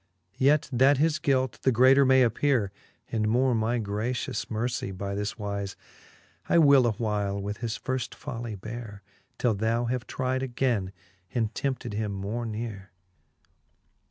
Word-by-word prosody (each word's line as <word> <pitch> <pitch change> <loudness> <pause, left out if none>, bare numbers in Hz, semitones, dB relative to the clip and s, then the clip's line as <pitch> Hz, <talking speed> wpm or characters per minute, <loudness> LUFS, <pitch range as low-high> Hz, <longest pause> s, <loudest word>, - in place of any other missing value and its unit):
Yet 145 +2 +4
that 135 +3 +5
his 155 +2 +2
guilt 130 -5 +1
the 130 - +3
greater 130 +3 +6
may 130 0 +6
appeare, 120 -3 +1 0.4
And 110 -1 0
more 125 +3 +3
my 115 +2 +1
gratious 110 +3 -2
mercie 115 -1 -2
by 100 +1 -4
this 105 +1 -3
wize, 100 -2 -4 0.7
I - - +4
will 140 -6 +6
a 115 - +1
while 105 -2 -1
with 100 +1 -4
his 115 -2 -3
firft 130 -2 -3
folly 115 -2 -6
beare, 105 0 -8 0.3
Till 120 -3 +2
thou 110 +3 0
have 125 0 -2
tride 130 0 -1
againe, 120 -7 -1 0.4
and 115 -2 0
tempted 130 -5 -3
him 105 -1 -2
more 105 +5 -3
neare. 105 -3 -5
115 Hz, 150 wpm, -27 LUFS, 105-130 Hz, 0.7 s, greater